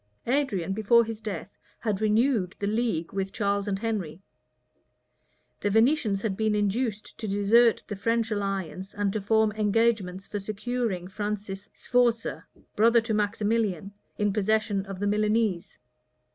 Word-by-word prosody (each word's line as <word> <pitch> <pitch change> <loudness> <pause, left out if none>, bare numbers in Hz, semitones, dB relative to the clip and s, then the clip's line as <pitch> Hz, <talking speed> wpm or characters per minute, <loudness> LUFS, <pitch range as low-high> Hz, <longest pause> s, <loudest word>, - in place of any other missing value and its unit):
[*] - - -44
Adrian 230 - 0
before 225 +3 +4
his 225 -1 -6
death 200 -3 -6 0.2
had 215 -2 -1
renewed 215 -3 +2
the 200 - -3
league 210 -6 -1
with 195 0 -2
Charles 200 -1 -1
and 195 -1 0
Henry. 195 -7 -3 1.4
The 205 - 0
Venetians 225 -2 +2
had 210 -4 -1
been 215 +1 +1
induced 210 +1 -1
to 220 - -4
desert 210 +4 +4
the 205 - -4
French 230 +3 0
alliance, 195 -2 -3
and 205 -1 0
to 215 - -2
form 220 +1 +3
engagements 210 -3 +1
for 205 - -4
securing 215 -2 -3
Francis 205 0 -4
Sforza, 240 -2 +1 0.3
brother 230 +2 +5
to 225 0 -3
Maximilian, 205 -2 0 0.2
in 205 -1 +1
possession 210 -1 0
of 195 -1 -6
the 205 - -2
Milanese. 210 -2 0
210 Hz, 145 wpm, -27 LUFS, 195-225 Hz, 1.4 s, brother